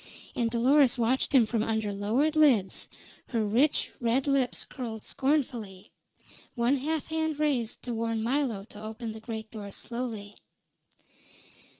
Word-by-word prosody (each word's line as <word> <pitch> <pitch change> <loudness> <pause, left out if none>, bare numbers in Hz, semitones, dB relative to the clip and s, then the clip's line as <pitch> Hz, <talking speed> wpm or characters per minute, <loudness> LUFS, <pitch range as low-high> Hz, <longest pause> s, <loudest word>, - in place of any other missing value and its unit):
And 235 -2 +1
Dolores 255 +3 +4
watched 245 +3 +1
him 255 -5 +6
from 220 0 0
under 220 -2 -1
lowered 235 +10 +1
lids, 260 -11 +3 0.4
her 225 -3 0
rich 245 +9 +2
red 240 +2 +1
lips 275 -3 +1
curled 230 -5 -6
scornfully, 245 -9 -1 0.6
one 240 +4 +2
hand 305 +3 -1
half 315 -1 -2
raised 265 -7 0
to 245 - -3
warn 225 -1 -1
Milo 240 -5 0
to 210 - -11
open 220 +1 -5
the 220 - -8
great 220 -1 -6
door 205 -3 -7
slowly. 225 -3 -5
235 Hz, 135 wpm, -29 LUFS, 220-275 Hz, 0.6 s, him